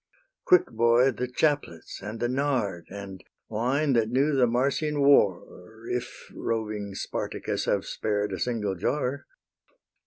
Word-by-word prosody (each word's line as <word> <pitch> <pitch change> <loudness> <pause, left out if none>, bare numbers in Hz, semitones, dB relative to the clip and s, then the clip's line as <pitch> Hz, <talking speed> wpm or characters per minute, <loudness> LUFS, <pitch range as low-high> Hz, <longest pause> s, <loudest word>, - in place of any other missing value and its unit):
Quick, 365 - +6
boy, 120 +3 +4
the 125 +1 -3
chaplets 140 - -1
and 105 +3 -6
the 120 - 0
nard, 125 -9 -1
And 95 -2 -8 0.3
wine, 130 +6 +1
that 115 -2 +2
knew 135 +5 +2
the 130 -3 +4
Marsian 140 +5 0
war, 105 -6 +2
If 125 0 -5
roving 105 -3 -3
Spartacus - - -3
have - - 0
spared 105 -1 -2
A - - -4
single 110 -5 -1
jar. 135 +8 -2
120 Hz, 130 wpm, -27 LUFS, 105-135 Hz, 0.3 s, Quick